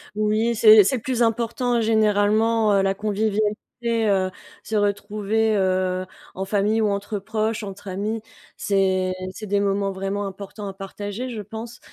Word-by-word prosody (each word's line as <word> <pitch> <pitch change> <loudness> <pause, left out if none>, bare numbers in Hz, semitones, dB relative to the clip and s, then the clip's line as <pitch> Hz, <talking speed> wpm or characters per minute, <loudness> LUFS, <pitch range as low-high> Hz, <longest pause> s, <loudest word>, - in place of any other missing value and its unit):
Oui, 215 +2 +1
c'est 215 -1 +8
c'est 260 - +1
le 230 - -4
plus 250 -1 -2
important, 235 +1 +1
généralement, 215 0 +3
heu, 195 - +4
la 195 0 +1
convivialité, 215 +2 -1
heu, 190 -1 +1 0.3
se 220 - -4
retrouver, 210 +1 0
heu, 185 -1 0 0.3
en 190 +1 -4
famille 210 +2 +1
ou 210 - +2
entre 200 +1 -2
proches, 220 +2 -2
entre 200 0 -8
amis, 210 +4 -3 0.4
c'est 190 -2 +1 0.2
c'est 215 - -8
des 200 0 +1
moments 200 0 0
vraiment 195 +1 -3
importants 200 +1 -7
à 195 - -5
partager, 205 +5 -6
je 220 -3 -5
pense. 225 +3 -8
210 Hz, 155 wpm, -23 LUFS, 195-220 Hz, 0.4 s, c'est